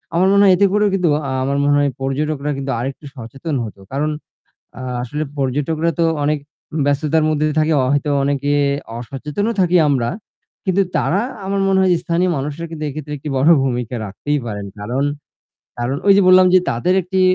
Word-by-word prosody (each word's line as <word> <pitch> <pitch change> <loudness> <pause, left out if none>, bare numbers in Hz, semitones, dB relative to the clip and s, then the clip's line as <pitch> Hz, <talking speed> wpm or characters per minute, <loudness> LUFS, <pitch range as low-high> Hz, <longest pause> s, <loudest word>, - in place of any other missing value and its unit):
আমার 185 +2 +4
মনে 200 0 +5
হয় 190 -2 +6
এতে 200 - +4
করেও 210 0 +3
কিন্তু 180 -4 +2 0.2
আ - - -2
আমার 140 +1 0
মনে 145 0 +3
হয় 145 -1 +2
পর্যটকরা 145 +2 -2
কিন্তু 135 0 -3
আরেকটু 135 +4 -5
সচেতন 135 +6 -6
হতো। 105 -3 -8
কারণ 145 +3 -1 0.7
আ - - -6 0.2
আসলে 150 +5 -3
পর্যটকরা 145 +5 0
তো 165 - +4 0.2
অনেক 150 +1 +1 0.5
ব্যস্ততার 150 +2 +1
মধ্যে 155 0 +1
থাকে 155 +1 +2 0.2
হয়তো 145 +1 0
অনেকে 140 0 0 0.5
অসচেতনও 150 - -3
থাকি 180 0 +3
আমরা। 125 -4 +1 0.6
কিন্তু 190 +1 +2 0.2
তারা 195 +5 +1 0.2
আমার 195 0 -1
মনে 190 0 +3
হয় 185 - +3
যে 170 - +1
স্থানীয় 175 +2 +1
মানুষের 150 +4 -4
কিন্তু 155 -1 -6
এক্ষেত্রে 150 +1 -6
একটি 145 +2 -7
বড় 140 +5 +3
ভূমিকা 125 -2 -2
রাখতেই 145 +9 -2
পারেন। 105 -2 -5
কারণ 120 +7 -2 0.8
কারণ 120 +3 -1
ওই 200 - +8
যে 200 - +5
বললাম 185 0 +7
যে - - +8
তাদের 150 +11 +1
একটি 185 +2 -1
150 Hz, 180 wpm, -19 LUFS, 135-175 Hz, 0.8 s, ওই